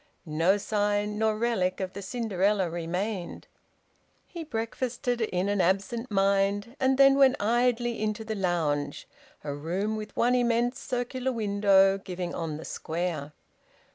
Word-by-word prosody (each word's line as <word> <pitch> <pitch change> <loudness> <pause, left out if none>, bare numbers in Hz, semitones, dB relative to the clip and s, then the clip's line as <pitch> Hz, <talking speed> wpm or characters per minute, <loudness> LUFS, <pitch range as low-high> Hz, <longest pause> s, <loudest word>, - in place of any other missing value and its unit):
No 165 +5 +2
sign 205 0 -1
nor 220 -1 +1
relic 215 -6 0
of 185 -1 -4
the 200 - -6
Cinderella 200 -4 0
remained. 175 +3 -4 0.8
He 340 -2 -7
breakfasted 245 -1 -3
in 185 -3 0
an 205 -1 +1
absent 200 +7 0
mind, 200 +3 +1
and 265 0 +2
then 275 0 +6
went 265 -2 +6
idly 240 +1 +1
into 215 +1 -2
the 220 - -3
lounge, 160 -7 -1 0.4
a 145 - -3
room 180 +9 -2
with 215 -1 -7
one 245 +1 +3
immense 240 0 +1
circular 250 +1 -2
window, 200 -3 +3
giving 180 -2 -5
on 160 -3 -3
the 160 - -8
Square. 160 -3 -4
205 Hz, 140 wpm, -28 LUFS, 185-235 Hz, 0.8 s, then